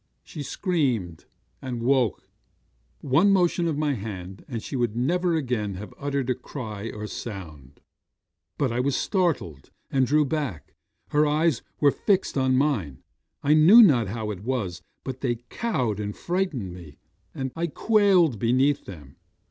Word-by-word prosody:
She 150 Hz, -, -8 dB
screamed, 130 Hz, -, -1 dB, 0.4 s
and 125 Hz, -3 st, -4 dB
woke. 125 Hz, -4 st, +1 dB, 0.7 s
'One 150 Hz, +9 st, +3 dB
motion 175 Hz, -2 st, +2 dB
of 155 Hz, -3 st, -1 dB
my 150 Hz, -1 st, +1 dB
hand, 95 Hz, -4 st, -7 dB
and 120 Hz, -5 st, -5 dB
she -, -, -6 dB
would 120 Hz, -4 st, 0 dB
never 170 Hz, +8 st, +1 dB
again 120 Hz, -9 st, -2 dB
have 105 Hz, +3 st, -8 dB
uttered 140 Hz, -3 st, -2 dB
cry 110 Hz, -5 st, -6 dB
or 105 Hz, 0 st, -6 dB
sound. 80 Hz, -, -8 dB, 0.8 s
But 135 Hz, -4 st, 0 dB
I 120 Hz, -, -1 dB
was 135 Hz, +2 st, +1 dB
startled, 160 Hz, -, -1 dB, 0.2 s
and 130 Hz, -2 st, +2 dB
drew 150 Hz, +2 st, +3 dB
back. 130 Hz, -, -4 dB, 0.4 s
Her 150 Hz, +1 st, +3 dB
eyes 150 Hz, -2 st, +2 dB, 0.2 s
were 145 Hz, -1 st, +5 dB
fixed 195 Hz, +5 st, 0 dB
on 130 Hz, -1 st, +2 dB
mine. 115 Hz, -, -1 dB, 0.4 s
I 145 Hz, -, +4 dB
knew 175 Hz, +10 st, +8 dB
not 125 Hz, -, +4 dB
how 110 Hz, +1 st, -3 dB
it 95 Hz, -3 st, -7 dB
was, 110 Hz, -9 st, -2 dB, 0.2 s
but 130 Hz, -1 st, -6 dB
they 120 Hz, -3 st, 0 dB
cowed 125 Hz, -, -1 dB
and 105 Hz, -1 st, -4 dB
frightened 170 Hz, -, -2 dB
me; 80 Hz, -5 st, -12 dB, 0.4 s
and 130 Hz, -1 st, -3 dB
I 170 Hz, +1 st, -1 dB
quailed 185 Hz, -, +3 dB
beneath 130 Hz, +6 st, +2 dB
them. 75 Hz, -8 st, -11 dB
130 Hz, 150 wpm, -25 LUFS, 105-155 Hz, 0.8 s, knew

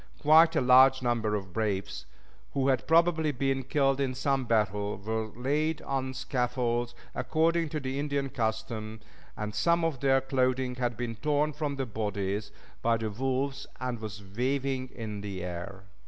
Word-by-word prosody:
Quite 160 Hz, +2 st, +6 dB
a -, -, +3 dB
large 130 Hz, +1 st, +6 dB
number 115 Hz, -3 st, +1 dB
of 95 Hz, -3 st, -5 dB
braves, 100 Hz, -2 st, -2 dB, 0.5 s
who 135 Hz, 0 st, +2 dB
had 130 Hz, -, +1 dB
probably 165 Hz, -1 st, +4 dB
been 135 Hz, 0 st, 0 dB
killed 135 Hz, +1 st, +1 dB
in 130 Hz, -2 st, -1 dB
some 135 Hz, 0 st, 0 dB
battle, 105 Hz, -2 st, 0 dB
were 110 Hz, +2 st, -2 dB
laid 145 Hz, +7 st, -1 dB
on 130 Hz, -1 st, -2 dB
scaffolds, 125 Hz, -2 st, -1 dB, 0.2 s
according 165 Hz, 0 st, +1 dB
to 155 Hz, -, -2 dB
the 135 Hz, 0 st, -3 dB
Indian 140 Hz, -1 st, -1 dB
custom, 110 Hz, -2 st, -3 dB, 0.4 s
and 105 Hz, 0 st, -4 dB
some 170 Hz, +11 st, +2 dB
of 155 Hz, -6 st, -1 dB
their 135 Hz, 0 st, +4 dB
clothing 130 Hz, -1 st, 0 dB
had 120 Hz, -3 st, -1 dB
been 115 Hz, -2 st, -4 dB
torn 150 Hz, +2 st, +1 dB
from 150 Hz, -1 st, -2 dB
the 135 Hz, -1 st, -2 dB
bodies 105 Hz, -2 st, -3 dB, 0.3 s
by 115 Hz, 0 st, +2 dB
the 110 Hz, -1 st, -3 dB
wolves 135 Hz, +4 st, -2 dB
and 125 Hz, -2 st, -3 dB
was 105 Hz, -1 st, -7 dB
waving 130 Hz, +1 st, 0 dB
in 110 Hz, -4 st, -6 dB
the 100 Hz, -3 st, -5 dB
air. 90 Hz, +2 st, -6 dB
130 Hz, 160 wpm, -29 LUFS, 110-140 Hz, 0.5 s, Quite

